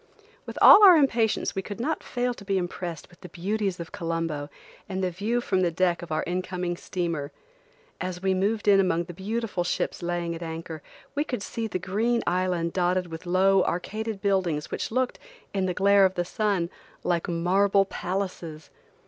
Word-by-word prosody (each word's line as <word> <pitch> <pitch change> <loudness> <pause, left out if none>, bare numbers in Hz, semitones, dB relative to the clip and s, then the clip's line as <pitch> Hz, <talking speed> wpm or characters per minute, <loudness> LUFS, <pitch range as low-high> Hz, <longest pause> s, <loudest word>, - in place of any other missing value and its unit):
With - - -7
all 420 - +10
our 375 -3 +10
impatience 235 -7 +2
we 195 - -2
could 205 +3 -8
not 305 +6 -1
fail 245 0 -2
to 215 - -12
be 195 -1 0
impressed 175 -2 -4
with 175 - -20
the 180 - -10
beauties 195 +1 -2
of 170 - -7
Colombo 165 -3 -3 0.4
and 190 0 -2
the 185 - 0
view 215 +7 -1
from 190 -5 0
the 175 - +3
deck 175 0 +1
of 175 -2 -9
our 155 - 0
incoming 180 0 -2
steamer. 170 -5 -3 0.7
As 185 -1 -3
we 190 +1 +1
moved 205 +3 0
in 200 -1 +6
among 175 -3 +2
the 175 +1 -9
beautiful 205 +1 -2
ships 175 - -2
laying 175 -1 -2
at 165 - -7
anchor, 160 -1 -6 0.3
we 290 - 0
could 250 -9 -4
see 230 0 -4
the 200 - -2
green 220 +6 0
island 180 -2 0
dotted 180 -1 0
with 165 +2 -8
low 190 +2 +4
arcaded 215 +3 -3
buildings 185 -7 0
which - - -3
looked, 255 +2 -1 0.3
in 190 -2 0
the 180 - -1
glare 200 +1 +5
of 190 0 0
the 175 - -1
sun, 190 -3 -1 0.3
like 170 -1 0
marble 195 +4 +3
palaces. 180 -5 -5
185 Hz, 185 wpm, -26 LUFS, 175-200 Hz, 0.7 s, all